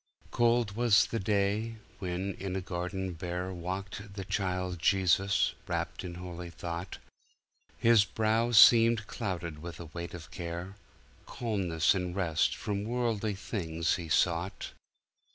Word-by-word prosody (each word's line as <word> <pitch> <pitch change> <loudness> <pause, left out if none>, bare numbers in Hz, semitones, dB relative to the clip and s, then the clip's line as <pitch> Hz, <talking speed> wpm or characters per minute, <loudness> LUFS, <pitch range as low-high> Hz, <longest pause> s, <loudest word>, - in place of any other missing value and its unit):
Cold 120 -3 +2
was 115 -3 +5
the 115 - -3
day, 105 +3 0 0.2
when 95 0 -3
in 95 -1 -3
a 95 - -1
garden 90 +1 -3
bare, 90 +2 -4
Walked 95 +3 -6
the 95 -2 -5
Child 90 -2 -2
Jesus, 95 +1 +3
wrapt 85 0 -3
in 90 -2 -6
holy 90 -1 -7
thought; 85 +1 -6 0.8
His 115 -2 +5
brow 110 +3 +1
seemed 115 -1 +7
clouded 90 -9 -4
with 85 +1 -8
a 85 - -7
weight 85 0 -5
of 85 -1 -10
care; 85 +2 -5 0.5
Calmness 95 -9 +1
and 90 -2 -3
rest 85 -5 +1
from 100 -1 -3
worldly 115 -3 -1
things 85 -5 -1
he 85 -2 -7
sought. 85 +4 0
95 Hz, 135 wpm, -30 LUFS, 85-105 Hz, 0.8 s, seemed